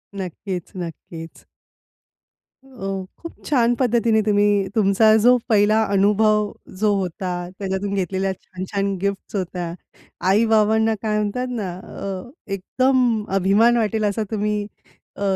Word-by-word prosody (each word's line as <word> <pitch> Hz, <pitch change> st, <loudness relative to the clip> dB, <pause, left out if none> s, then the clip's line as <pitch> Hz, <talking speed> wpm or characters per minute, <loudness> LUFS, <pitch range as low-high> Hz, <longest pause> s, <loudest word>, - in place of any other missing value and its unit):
नक्कीच, 185 Hz, -1 st, -5 dB
नक्कीच. 165 Hz, -1 st, -8 dB, 1.2 s
अ, 195 Hz, -8 st, -5 dB
खूप 335 Hz, -, -8 dB
छान 245 Hz, -4 st, +3 dB
पद्धतीने 235 Hz, -3 st, +3 dB
तुम्ही 205 Hz, -1 st, +2 dB
तुमचा 215 Hz, +1 st, +4 dB
जो 250 Hz, +1 st, +6 dB
पहिला 215 Hz, +1 st, +4 dB
अनुभव 210 Hz, +1 st, +3 dB, 0.3 s
जो 210 Hz, 0 st, +3 dB
होता, 185 Hz, 0 st, -3 dB, 0.3 s
त्याच्यातून 195 Hz, 0 st, -2 dB
घेतलेल्या 190 Hz, 0 st, -1 dB
छान-छान 195 Hz, +2 st, -4 dB
गिफ्ट्स 200 Hz, +1 st, -3 dB
होत्या. 180 Hz, -2 st, -3 dB, 0.6 s
आई-बाबांना 220 Hz, +1 st, +3 dB
काय 215 Hz, -1 st, 0 dB
म्हणतात 210 Hz, +4 st, -1 dB
ना 220 Hz, -6 st, -3 dB
अ, 190 Hz, +2 st, -7 dB, 0.2 s
एकदम 245 Hz, +2 st, +1 dB
अभिमान 205 Hz, +6 st, +4 dB
वाटेल 220 Hz, -1 st, 0 dB
असा 210 Hz, +2 st, 0 dB
तुम्ही 210 Hz, -1 st, -1 dB, 0.5 s
अ, -, -, -11 dB
205 Hz, 115 wpm, -22 LUFS, 195-220 Hz, 1.2 s, जो